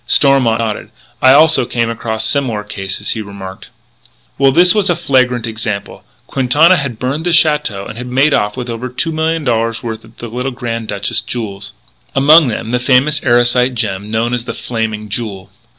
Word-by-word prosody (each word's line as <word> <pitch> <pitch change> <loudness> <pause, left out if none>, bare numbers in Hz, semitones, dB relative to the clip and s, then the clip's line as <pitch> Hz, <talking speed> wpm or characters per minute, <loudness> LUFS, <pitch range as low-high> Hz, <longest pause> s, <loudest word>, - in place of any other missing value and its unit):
Stormont 135 -5 +3
nodded: 110 -2 -3 0.3
"I 130 - +6
also 150 -2 +5
came 120 -2 -1
across 110 -1 -3
similar 115 -4 -1
cases," 100 -1 -3
he 110 - -2
remarked. 100 -2 -9 0.7
"Well, 135 -1 +4
this 175 +5 +6
was 205 -3 +1
a 175 - +2
flagrant 130 -7 +1
example. 110 -3 -5 0.2
Quintana 145 +7 +3
had 135 -5 -4
burnt 135 +6 -3
the - - +1
château 150 - +2
and 110 - -8
had 125 - -6
made 135 +4 +2
off 105 +3 0
with 125 -1 -4
over 120 +2 -5
two 165 +6 -2
million 160 0 -1
dollars 115 -3 -1
worth 110 -2 -5
of 110 0 -19
the 120 - -7
little 125 +3 -3
Grand 115 -3 -5
Duchess's 100 0 -2
jewels 105 -4 -6 0.4
among 150 +3 +6
them 115 -1 -4
the 125 - +1
famous 135 +4 +2
Erosite 120 +1 +2
gem 105 -3 -3
known 115 +2 -1
as 120 -1 -2
The 115 - -5
Flaming 110 -2 -4
Jewel." 100 -3 -6
120 Hz, 180 wpm, -15 LUFS, 110-135 Hz, 0.7 s, I